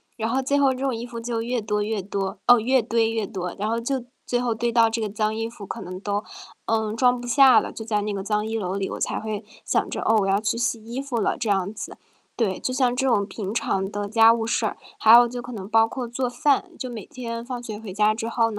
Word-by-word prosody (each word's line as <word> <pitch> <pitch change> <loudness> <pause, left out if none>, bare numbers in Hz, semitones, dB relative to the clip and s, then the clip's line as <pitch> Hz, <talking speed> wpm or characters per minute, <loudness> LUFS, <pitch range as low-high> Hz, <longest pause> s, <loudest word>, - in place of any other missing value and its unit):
然 220 -1 -2
后 260 +3 +1
最 280 +2 +1
后 275 -2 +4
这 255 - -8
种 265 -2 0
衣 230 +1 -5
服 235 -1 -7
就 230 0 -3
越 240 0 -1
多 210 -1 -1
越 215 -1 -2
多 195 +1 -4
哦， 245 -1 +8
越 255 +3 +3
堆 225 0 +1
越 225 -2 -1
多， 180 -2 -4
然 210 +2 -1
后 230 +1 0
就 250 +1 -2 0.2
最 245 - 0
后 240 -2 0
堆 235 +1 -1
到 230 -1 +5
这 230 - -2
个 220 - -1
脏 215 +1 -1
衣 225 0 -2
服 230 -2 -11
可 - - -6
能 185 +1 -7
都， 205 +1 -2 0.4
嗯， 220 -1 0
装 245 0 +3
不 245 - -7
下 265 +1 +7
了， - - -5
就 220 - -8
在 210 -2 0
那 210 +1 -2
个 195 -1 -3
脏 210 +1 0
衣 225 0 -2
娄 185 -4 -2
里， 195 -1 -2
我 - - -5
才 - - -1
会 215 -2 -5 0.2
想 - - +1
着， - - -3
哦， 225 - +3
我 195 - 0
要 195 +2 +2
去 220 +1 0
洗 230 -1 -1
衣 235 +4 -5
服 275 -3 -3
了 - - 0
这 235 - -3
样 195 -1 +1
子。 220 - -8 0.4
对， 200 -6 0
就 255 - -2
像 255 -2 +2
这 265 +1 0
种 205 -5 +2
平 200 -1 -5
常 195 -4 -1
的 205 -1 -3
家 225 +1 +6
务 230 -1 -1
事 - - +1
儿， - - -2 0.2
还 225 +1 +8
有 240 0 +8
就 245 +1 -6
可 245 - -9
能 200 -4 -7
包 225 0 +5
括 245 +1 -5
做 245 +2 -2
饭， 295 +7 +1
就 255 - -4
每 225 -5 -7
天 230 -2 -6
放 250 -1 -5
学 220 -3 -6
回 215 -4 -8
家 210 +2 +3
之 225 0 -4
后， 230 0 +1
225 Hz, 295 characters per minute, -24 LUFS, 210-245 Hz, 0.4 s, 哦